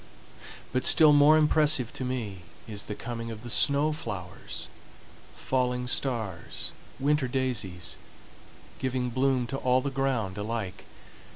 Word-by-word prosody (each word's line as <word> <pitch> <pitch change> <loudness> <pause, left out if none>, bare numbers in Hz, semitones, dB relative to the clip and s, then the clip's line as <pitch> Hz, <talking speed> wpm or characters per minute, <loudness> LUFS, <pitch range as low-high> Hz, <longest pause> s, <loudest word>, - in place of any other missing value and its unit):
But 130 0 +1
still 155 0 +7
more 145 +2 +7
impressive 150 -5 +3
to - - -3
me 115 -7 -4 0.3
is 105 -2 -5
the 105 - -5
coming 115 0 -6
of 110 0 -8
the 120 - -3
snow 145 +4 +4
flowers,—falling 125 - -5
stars, 110 -11 -2 0.3
winter 145 0 +1
daisies,—giving 125 +2 -4
bloom 130 0 +1
to 135 +3 -4
all 130 -1 +2
the 140 +1 -3
ground 125 -8 -1
alike. 105 -3 -4
125 Hz, 115 wpm, -28 LUFS, 110-135 Hz, 0.3 s, still